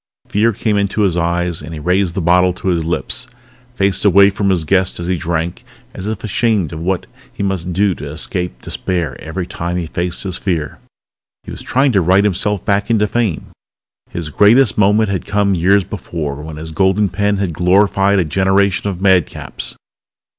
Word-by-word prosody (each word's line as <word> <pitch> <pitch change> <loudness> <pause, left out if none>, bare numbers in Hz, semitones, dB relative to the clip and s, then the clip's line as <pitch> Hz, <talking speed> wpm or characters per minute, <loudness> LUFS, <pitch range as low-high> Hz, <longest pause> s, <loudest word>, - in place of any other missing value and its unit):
Fear 110 +3 +2
came 105 +1 0
into 100 +1 0
his 95 -4 +2
eyes 85 -1 -1
and 80 +2 -8
he - - -7
raised 90 +2 0
the 95 - -2
bottle 90 +2 +3
to 95 - -3
his 85 -2 0
lips, 80 -5 -3 0.5
faced 100 -3 +1
away 100 0 +6
from 100 0 -1
his 90 -4 +1
guest 95 +3 +1
as 85 - -4
he 90 +1 0
drank 85 0 -3 0.3
as 95 - -6
if 110 -2 -4
ashamed 105 -5 0
of 80 - -5
what 90 +2 -1 0.3
he - - -5
must 95 -3 -2
do 95 +2 +2
to 75 - -8
escape 85 -2 -3
despair 85 -8 -3
every 85 +3 -4
time 85 +1 -4
he 90 - -2
faced 85 +2 -3
his 95 -3 -3
fear. 80 -6 -2 0.6
He - - -9
was - - -8
trying 135 +1 +1
to 100 -5 +3
write 95 +4 +3
himself 105 0 0
back 100 +1 0
into 110 -2 +3
fame. 110 -5 -2 0.6
His 80 -3 -5
greatest 110 - +5
moment 105 +1 +3
had 95 -4 -2
come 100 -1 +1
years 95 +3 +3
before 75 -4 -5
when 80 0 -8
his 80 +1 -7
golden 95 +4 +2
pen 100 +1 0
had 95 -4 -2
glorified 95 +3 +3
a 90 - +2
generation 95 +4 +1
of 95 -2 -5
madcaps. 95 -4 0
95 Hz, 190 wpm, -17 LUFS, 85-100 Hz, 0.6 s, away